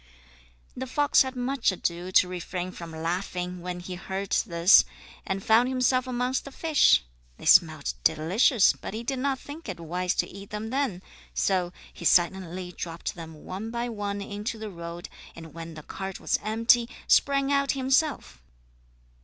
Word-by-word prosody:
The 260 +1 -5
fox 290 +3 +3
had 260 0 -1
much 250 -2 0
ado 175 0 -3
to 185 - +5
refrain 180 0 -5
from 170 -2 -9
laughing 180 +2 -3
when 180 0 -5
he 180 +1 -7
heard 190 +2 -5
this 170 -1 +5 0.4
and 190 0 -2
found 230 +3 +4
himself 255 0 +1
amongst 250 +1 -1
the 275 - -10
fish. 295 - +4 0.3
They - - -11
smelt - - +4
delicious, 190 - +4
but - - -8
he 225 - -4
did 260 +2 -2
not 270 0 0
think 290 0 -10
it 185 - -5
wise 180 +2 -2
to - - 0
eat 195 +1 -11
them 215 +2 -5
then, 255 -10 -1 0.3
so 180 -3 +1 0.2
he - - -11
silently 180 0 +2
dropped 165 -1 -5
them 160 -3 -11
one 195 +5 -5
by 235 +1 -3
one 205 -2 -4
into 205 +3 -5
the 215 -1 -6
road, 170 0 -7 0.3
and 165 -1 -11
when 165 0 -8
the 155 - -9
cart 190 +3 -6
was - - 0
empty, 230 +2 +3 0.2
sprang 275 0 +3
out 280 0 +2
himself. 270 - 0
195 Hz, 165 wpm, -27 LUFS, 175-250 Hz, 0.4 s, to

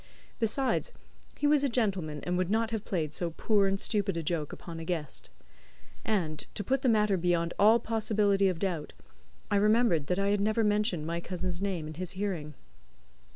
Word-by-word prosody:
Besides, 260 - +1 0.5
he 290 - -1
was 290 -1 +4
a 280 - +2
gentleman, 190 - -1
and 180 - -1
would 180 0 0
not 225 +2 +1
have 220 -2 -2
played 155 -6 -2
so 175 0 0
poor 205 -3 +3
and 195 0 0
stupid 200 -5 0
a 165 - -2
joke 155 -2 -2
upon 165 -2 -8
a - - -5
guest. 160 -4 -4 0.7
And, 170 -8 -1 0.2
to 205 - -2
put 265 +6 0
the 260 - +2
matter 210 -3 +3
beyond 170 -1 +1
all 220 +3 +6
possibility 210 -3 +1
of 185 -3 0
doubt, 165 -4 -3 0.6
I 205 - +4
remembered 210 -7 +3
that 180 - 0
I 200 0 +1
had 205 0 +2
never 215 +2 +2
mentioned 210 -6 +1
my 170 +1 -2
cousin's 180 0 -4
name 190 -6 -2
in 155 - -6
his 180 +3 -5
hearing. 180 -7 -3
195 Hz, 190 wpm, -30 LUFS, 170-215 Hz, 0.7 s, all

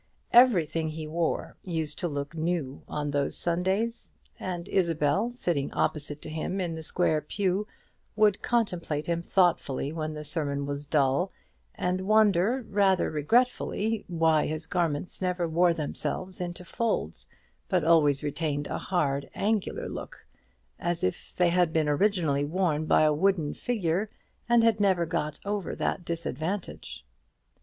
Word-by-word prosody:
Everything 170 - +5
he 155 0 -5
wore 165 +2 -2
used 160 -4 -3
to 175 - 0
look 145 -1 -4
new 160 -4 -2
on 150 -1 -3
these 140 -1 -1
Sundays; 190 +7 -1 0.3
and 175 -2 -4
Isabel, 165 +2 +1
sitting 175 - -1
opposite 150 -1 -1
to - - -6
him 160 +5 -3
in 175 -3 -2
the 160 - -6
square 160 -1 +1
pew 195 +5 -1 0.5
would 210 -2 +3
contemplate 180 -10 0
him 170 0 -1
thoughtfully 170 -7 +1
when 155 -1 -3
the 150 - -6
sermon 140 -2 -1
was 145 +1 -4
dull, 145 +5 +2 0.4
and 180 +1 -1
wonder, 215 +3 +3
rather 195 -2 +2
regretfully, 220 - +1
why 160 -3 +2
his 155 +1 -4
garments 170 -1 -2
never 180 -2 0
wore 170 +2 +3
themselves 180 +4 -3
into 180 0 -5
folds, 230 +6 -2 0.4
but 180 -4 +2
always 155 -3 +4
retained 145 0 -1
a - - -3
hard 140 -6 -1
angular 210 -1 -1
look, - - -8 0.5
as 175 0 -1
if 185 -1 -3
they 180 -1 +3
had 175 -1 +3
been 160 -2 +1
originally 150 -3 +2
worn 155 -1 0
by - - +5
a 155 -1 +4
wooden 165 -2 +1
figure, 200 -3 -1 0.4
and 235 -1 +5
had 225 -2 +3
never 190 -4 +3
got 150 -2 -2
over 205 -1 -2
that 180 - -1
disadvantage. 170 - -4
170 Hz, 145 wpm, -28 LUFS, 150-190 Hz, 0.5 s, Everything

